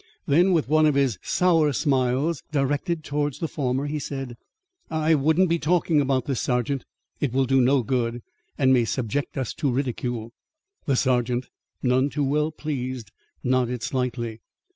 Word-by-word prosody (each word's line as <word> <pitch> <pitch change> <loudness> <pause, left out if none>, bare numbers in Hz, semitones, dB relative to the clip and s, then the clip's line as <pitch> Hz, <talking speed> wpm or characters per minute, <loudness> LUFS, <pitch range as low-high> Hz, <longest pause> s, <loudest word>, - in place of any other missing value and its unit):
Then, 175 +7 +4
with 165 -7 +2
one 155 +2 +4
of 150 - +2
his 135 -9 +1
sour 165 -5 +3
smiles 135 +2 +1
directed 145 +3 0
towards 145 -1 -2
the 165 - -2
former, 135 -2 -1
he 150 +1 -2
said: 135 -3 -5 0.5
"I 160 0 +2
wouldn't 160 +5 +3
be 170 0 +1
talking 160 -1 +2
about 135 -2 0
this, 135 -4 -1
sergeant. 125 +2 -1 0.3
It 145 - 0
will 135 0 +2
do 135 +1 +3
no 130 +1 +3
good, 120 -1 -1 0.3
and 130 -2 +4
may 125 -2 +4
subject 130 +5 -2
us 130 -5 -2
to 145 - -1
ridicule." 120 -3 -2 0.6
The 140 - +3
sergeant, 125 -1 +1 0.3
none 130 +2 +2
too 145 0 -2
well 150 +3 +1
pleased, 130 -7 -5 0.3
nodded 125 -2 0
slightly. 120 -3 -2
135 Hz, 160 wpm, -24 LUFS, 125-150 Hz, 0.6 s, Then